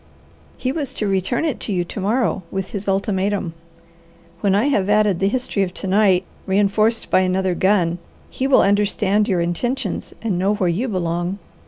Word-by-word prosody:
He 255 - -1
was 285 -2 -3
to 210 - -2
return 195 - 0
it 300 -7 -2
to - - -4
you 180 -2 0
to 175 - -7
morrow 215 +1 0
with 190 -1 -4
his 200 -1 -5
ultimatum. 195 -2 0 0.9
When 195 -2 +2
I 210 +5 +2
have 205 -8 +1
added 210 -3 +3
the 195 - +2
history 245 -2 -1
of 185 -2 -2
to - - -6
night, 190 -1 +3 0.2
reinforced 205 +3 +1
by - - +5
another 185 0 +1
gun, 180 -2 +1 0.3
he 265 - -1
will 275 - +5
understand 205 +1 +2
your 185 -5 +1
intentions 215 +6 -2
and 200 -6 -1
know 195 +3 +2
where 185 -3 0
you 205 +10 -1
belong. 175 -2 -2
195 Hz, 180 wpm, -20 LUFS, 185-215 Hz, 0.9 s, by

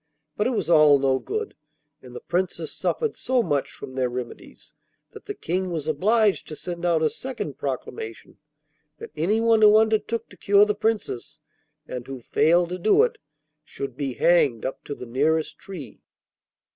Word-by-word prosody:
But 210 - +1
it 255 - 0
was - - -1
all 155 -4 +6
no 135 -1 +1
good, 435 - -4 0.5
and 125 -1 -13
the - - -5
Princess 175 -2 -2
suffered 455 -3 -1
so 255 -1 0
much 145 -7 -1
from 130 - -10
their 130 -1 0
remedies 120 -1 -8 0.4
that - - -13
the - - -4
King 185 +2 -2
was 160 -4 -4
obliged 205 +7 +2
to 155 - -7
send 175 +2 -6
out 165 -2 +2
a 155 - +3
second 235 - -6
proclamation 125 -4 -6 0.6
that - - -10
anyone 220 +7 +2
who 210 0 +8
undertook 220 +1 +1
to - - -16
cure 205 0 +5
the 210 - 0
Princess, 210 - -2 0.5
and 125 -1 -6
who 135 -1 -6
failed 170 +8 +2
to 180 +1 -4
do 220 - +4
it, 485 - -1 0.4
should 140 -4 -7
be 135 -3 -3
hanged 140 -10 +3
up 130 - -5
to 145 - -5
the 125 - -8
nearest 155 +5 0
tree. 160 - -9
170 Hz, 170 wpm, -24 LUFS, 135-210 Hz, 0.6 s, who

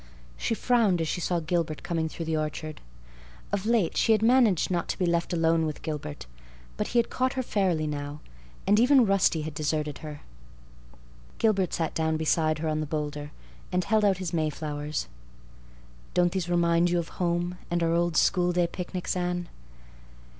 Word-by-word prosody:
She 225 - -1
frowned 225 -7 +2
as 165 - -1
she 175 - -2
saw 175 0 0
Gilbert 160 -1 -2
coming 165 -2 -1
through 165 - -6
the 160 0 -1
orchard. 155 0 -4 0.7
Of 200 +1 -1
late 225 -7 +2
she 225 - +4
had 215 0 +1
managed 230 -8 +4
not 175 -2 0
to - - -2
be 185 - +1
left 170 -1 0
alone 165 -1 +2
with 150 - -6
Gilbert. 150 -1 -5 0.5
But - - -2
he 245 - -1
had 235 - +2
caught 255 +1 0
her 260 - -1
fairly 185 -9 0
now; 145 0 -4 0.5
and 205 +2 +4
even 255 +1 +6
Rusty 195 -5 +2
had 155 0 -5
deserted 150 -1 -2
her. 150 -2 -8 1.2
Gilbert 195 -5 +2
sat 165 -2 -1
down 160 0 0
beside 155 0 +1
her 160 +1 -3
on 155 0 0
the 155 - -2
boulder 150 -1 -3 0.4
and 180 0 +1
held 215 +3 +2
out 195 -3 +3
his 185 -2 -4
Mayflowers. 150 -2 -2 1.1
"Don't 175 -1 +3
these 180 -2 -2
remind 170 0 +3
you 175 - +1
of 170 -1 -2
home 175 +1 0
and 175 0 0
our 165 0 +2
old 170 0 +1
schoolday 180 -1 +3
picnics, 180 0 -4
Anne?" 175 -1 -2
170 Hz, 175 wpm, -27 LUFS, 155-185 Hz, 1.2 s, even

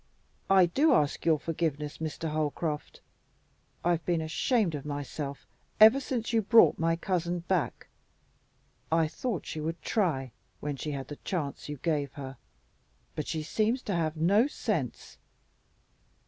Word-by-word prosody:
I 190 -2 +7
do 280 - +3
ask 145 0 0
your 160 -2 +5
forgiveness, 150 -1 -3
Mr. 160 0 -3
Holcroft. 150 0 -2 0.8
I've 170 -1 +2
been 175 -2 +1
ashamed 170 +4 +1
of 145 -2 -4
myself 145 -1 -5 0.3
ever 220 +5 +9
since 245 -4 -3
you 225 - +4
brought 225 +2 +6
my 165 0 +2
cousin 175 0 -1
back. 170 -7 -1 1.1
I 165 -1 +3
thought 210 +4 -3
she 155 - -5
would 165 +2 -3
try, 145 - 0 0.3
when 145 -1 -3
she 150 - -5
had 135 -2 -5
the 145 - -7
chance 150 -6 -4
you 150 - -4
gave 145 -2 -1
her, 135 -2 -8 0.8
but 150 - -4
she 155 -1 -2
seems 225 +9 0
to 200 - -2
have 160 -2 -1
no 200 - +4
sense." 205 - -3
165 Hz, 145 wpm, -29 LUFS, 150-190 Hz, 1.1 s, ever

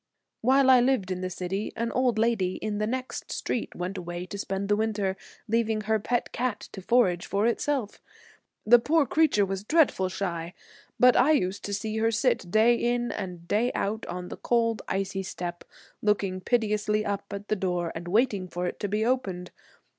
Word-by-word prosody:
While 265 +2 +5
I 255 -1 +7
lived 245 -7 +1
in 185 0 -3
the 185 - -2
city 190 +3 -3
an 230 0 -2
old 250 -3 +1
lady 215 -5 +1
in 210 -1 -3
the 215 - 0
next 255 +2 -4
street 240 - -3
went 185 +2 -4
away 175 0 -5
to 200 - -7
spend 195 0 -3
the 205 - +3
winter, 205 -3 -1 0.3
leaving 225 -1 +1
her 220 +1 +1
pet 240 +3 -1
cat 240 -4 -1
to 195 - -8
forage 185 -5 +2
for 200 +2 0
itself. 235 -1 -1 0.6
The 240 +3 +7
poor 305 +5 +2
creature 280 -7 +3
was 195 0 -4
dreadful 265 - +3
shy, 170 -2 -4 0.4
but 250 0 +6
I 305 +5 +5
used 190 -8 0
to 205 - -4
see 215 +2 -3
her 225 +1 +2
sit 225 -5 0
day 220 +5 +5
in 240 0 0
and 180 -4 -6
day 230 +6 +1
out 215 +3 -2
on 180 0 -5
the - - -7
cold, 230 -2 +1
icy 195 0 -2
step, 175 -2 -6 0.4
looking 200 -3 0
piteously 215 -1 +1
up 200 0 -2
at 200 +1 -6
the 215 - +2
door 180 -3 -1
and 170 +1 -7
waiting 205 -1 +1
for 180 0 -4
it 180 - -4
to 205 - -2
be 210 +2 0
opened. 195 -8 -1
210 Hz, 190 wpm, -27 LUFS, 185-235 Hz, 0.6 s, I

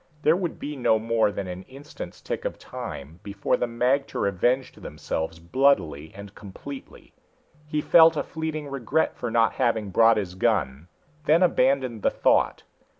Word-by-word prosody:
There 155 +2 +5
would 175 -3 -3
be 150 +1 -6
no 120 -4 +2
more 110 -1 +1
than 100 -1 -4
an 90 0 -6
instant's 140 +3 -10
tick - - -4
of - - -4
time 75 +5 -8
before 100 -1 -1
the 125 - -1
magter 125 0 0
avenged 120 +8 0
themselves 80 0 -4
bloodily 85 - +1
and 100 0 -10
completely. 130 +8 -11 0.5
He 150 0 -1
felt 160 0 +6
a - - 0
fleeting 160 -2 -5
regret 140 +3 -1
for 120 - -4
not 115 0 +2
having 110 -5 +1
brought 115 +3 +5
his 95 -4 -3
gun, 75 -4 0 0.4
then 165 +4 +4
abandoned 130 - +2
the - - +3
thought. - - +1
115 Hz, 155 wpm, -25 LUFS, 100-140 Hz, 0.5 s, felt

